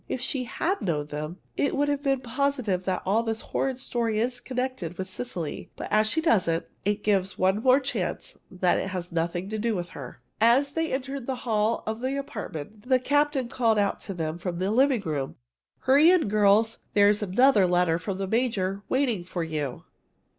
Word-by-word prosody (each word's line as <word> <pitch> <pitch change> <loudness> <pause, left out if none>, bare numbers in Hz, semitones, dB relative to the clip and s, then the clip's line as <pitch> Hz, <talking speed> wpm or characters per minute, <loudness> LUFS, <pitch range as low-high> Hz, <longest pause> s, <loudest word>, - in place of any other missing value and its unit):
If - - -2
she 255 0 -2
had 365 +10 -1
known 150 -5 -1
them, 150 +4 -5 0.2
it 285 - 0
would 290 +1 +1
have 285 -1 0
been 270 -2 +1
positive 250 -7 -1
that 185 -1 -1
all 205 +4 +3
this 225 -1 -3
horrid 265 -2 -2
story 235 -4 -1
is 245 +2 -1
connected 250 -10 -4
with 190 - -4
Cecily. 185 -6 -5
But - - -6
as 215 0 +4
she 320 - +1
doesn't, 180 - +2 0.2
it 205 +1 -1
gives 195 -2 +1
one 190 +3 +2
more 255 +2 +5
chance 275 0 -3
that 180 -1 +1
it - - -2
has 180 -2 -5
nothing 170 +2 -1
to 215 - -2
do 225 0 0
with 175 -2 -4
her." 135 -8 -9 0.2
As 255 +5 +4
they 325 +1 -1
entered 270 -1 -3
the 255 -2 -4
hall 220 0 +1
of 220 +2 -3
the 265 +2 -1
apartment, 210 - -7
the 260 - +6
captain 285 0 +1
called 230 -3 +1
out 200 -1 +1
to 195 - -7
them 160 0 -3
from 175 -1 -3
the 190 +3 0
living 260 0 +3
room: 145 -7 -3 0.5
"Hurry 280 +5 +6
in, 360 - +4
girls! 215 +2 +3 0.2
There's 205 +1 +5
another 205 +1 +4
letter 175 -2 +2
from 185 +3 -4
the 195 - -2
major 200 -3 0
waiting 250 -9 +1
for 175 -1 -4
you!" 150 -5 -4
215 Hz, 195 wpm, -26 LUFS, 185-255 Hz, 0.5 s, the